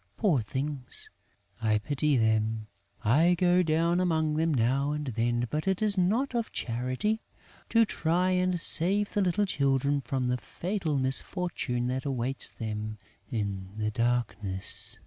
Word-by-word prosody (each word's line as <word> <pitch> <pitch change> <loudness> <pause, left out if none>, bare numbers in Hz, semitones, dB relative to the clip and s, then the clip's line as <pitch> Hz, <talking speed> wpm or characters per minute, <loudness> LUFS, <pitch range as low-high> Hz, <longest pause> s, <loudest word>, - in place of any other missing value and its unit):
Poor 175 - +2
things, 135 +3 -3 0.5
I 110 -1 +2
pity 145 +5 +1
them! 110 -1 +1 0.4
I 160 +11 +4
go 180 +1 +3
down 165 +1 +2
among 160 -4 +1
them 160 +2 +1
now 135 +3 +1
and 150 0 -3
then, 120 -1 0
but 155 +4 -2
it 190 -1 +1
is 215 -2 +4
out 215 +9 +1
of 235 -2 -1
charity, 130 - -1 0.5
to 230 0 +5
try 180 -1 +1
and 180 -1 +1
save 195 +6 +2
the 205 - +1
little 195 +2 +2
children 140 -3 +1
from 130 +1 -2
the 125 0 +1
fatal 175 +1 -3
misfortune 135 -1 0
that 130 +2 -2
awaits 135 -1 0
them 110 -1 -5 0.3
in 100 -6 -3
the 110 0 -1
darkness." 105 -5 -2
140 Hz, 145 wpm, -29 LUFS, 120-180 Hz, 0.5 s, to